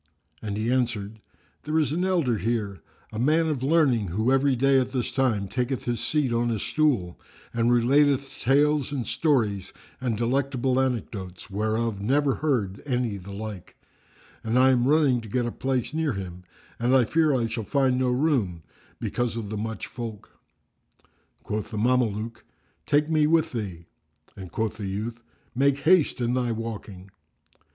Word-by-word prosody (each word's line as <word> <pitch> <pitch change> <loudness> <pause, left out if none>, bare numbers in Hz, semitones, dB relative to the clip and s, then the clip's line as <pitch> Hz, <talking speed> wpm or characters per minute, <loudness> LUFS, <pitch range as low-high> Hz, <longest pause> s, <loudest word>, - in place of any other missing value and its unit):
And 105 -1 -4
he 110 +3 0
answered, 110 -4 -1 0.4
"There 155 +1 -1
is 155 -3 +2
an 170 +4 0
elder 165 - +1
here, 105 -2 -2 0.3
a 110 - -4
man 155 +6 +3
of 150 -5 -1
learning, 135 - +3
who 110 +9 0
every 135 0 +3
day 135 +2 +4
at 130 0 -1
this 125 -3 -2
time 120 -7 +1
taketh 125 +5 -2
his 120 -1 -2
seat 130 0 0
on 120 +1 +1
a 115 - 0
stool[FN#350] 110 - 0 0.4
and 115 0 +2
relateth 140 +3 +3
tales 145 +2 +3
and 135 -5 -2
stories 115 - 0 0.3
and 120 -4 -1
delectable 130 +1 0
anecdotes, 105 -8 -3
whereof 110 +1 -1
never 135 +5 +2
heard 115 -11 -1
any 125 -6 -1
the 100 +1 -10
like; 105 -2 -7 0.7
and 115 +2 0
I 130 +1 +6
am 125 -1 +2
running 140 -5 +3
to 110 - -10
get 125 +4 0
me 120 - -1
a - - -7
place 130 +1 -2
near 160 -3 0
him 90 -2 -7 0.3
and 125 0 +3
fear 155 -1 +3
I 120 -3 +1
shall 115 0 -3
find 130 +1 +1
no 130 -1 +2
room, 125 - 0 0.4
because 120 -1 -2
of 110 -3 -4
the - - -3
much 110 +1 -4
folk." 115 -4 -8 1.1
Quoth 105 0 -3
the 110 - -5
Mameluke, 115 -1 0 0.4
"Take 150 +1 +3
me 155 -2 +3
with 160 0 +2
thee;" 95 -8 -5 0.5
and 95 -3 -9
quoth 110 -1 -2
the 105 -3 -4
youth, 110 +5 -4 0.3
"Make 140 +2 +2
haste 160 0 +3
in 120 0 0
thy 125 -2 0
walking." 105 -4 -6
120 Hz, 165 wpm, -26 LUFS, 110-135 Hz, 1.1 s, I